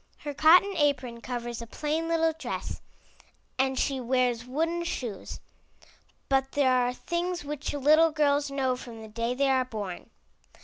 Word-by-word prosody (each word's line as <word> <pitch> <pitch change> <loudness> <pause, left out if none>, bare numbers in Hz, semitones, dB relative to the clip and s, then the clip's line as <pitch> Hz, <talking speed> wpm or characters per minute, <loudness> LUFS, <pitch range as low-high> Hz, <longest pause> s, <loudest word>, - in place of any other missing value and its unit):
Her 290 - -5
cotton 355 +7 +6
apron 255 -6 0
covers 240 -1 -5
a 235 - -7
plain 310 +6 -2
little 325 -1 +2
dress, 320 - -5 0.8
and 265 0 +1
she 275 0 0
wears 245 -1 0
wooden 330 +6 -1
shoes. 240 - -5 0.9
But 270 0 +1
there 275 -3 +3
are 250 -1 +2
things 345 +6 -3
which 295 0 -4
little 305 +3 +5
girls 290 -2 +1
know 265 -2 0
from 235 -3 -10
the 220 - -9
day 230 +3 -2
they 275 +1 +2
are 260 -1 +3
born. 210 -7 -6
270 Hz, 150 wpm, -28 LUFS, 245-305 Hz, 0.9 s, cotton